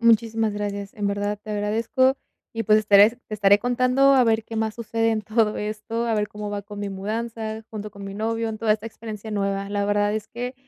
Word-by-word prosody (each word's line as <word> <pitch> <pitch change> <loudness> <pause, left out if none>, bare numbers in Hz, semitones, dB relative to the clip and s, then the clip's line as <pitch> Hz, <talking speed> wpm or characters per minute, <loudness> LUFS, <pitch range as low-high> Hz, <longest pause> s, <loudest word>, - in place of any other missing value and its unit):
Muchísimas 225 -1 +3
gracias. 205 -1 -4
En 205 -1 -2
verdad 205 +1 -1
te 215 - -8
agradezco 225 +6 +1 0.4
y, 225 0 -2
pues, 215 +1 +5
estaré 205 0 +6 0.2
te 215 - -5
estaré 200 -1 +5
contando 255 +3 +3
a 255 -2 +5
ver 225 -1 +2
qué 225 - -7
más 220 -1 -1
sucede 225 0 0
en 215 -1 -1
todo 215 0 +1
esto. 215 +2 -3
A 230 - +1
ver 210 -1 0
cómo 210 0 -6
va 205 0 -3
con 205 0 -10
mi 205 - -3
mudanza 220 +2 -4
junto 210 -1 -6
con 200 0 -10
mi 195 0 -6
novio 225 +2 -1
en 215 -1 -5
toda 220 -2 +3
esta 215 +1 -3
experiencia 220 -1 -8
nueva. 200 -1 -1
La 205 0 0
verdad 205 0 +1
es 215 -1 -4
que, 245 +2 -5
215 Hz, 225 wpm, -24 LUFS, 205-225 Hz, 0.4 s, estaré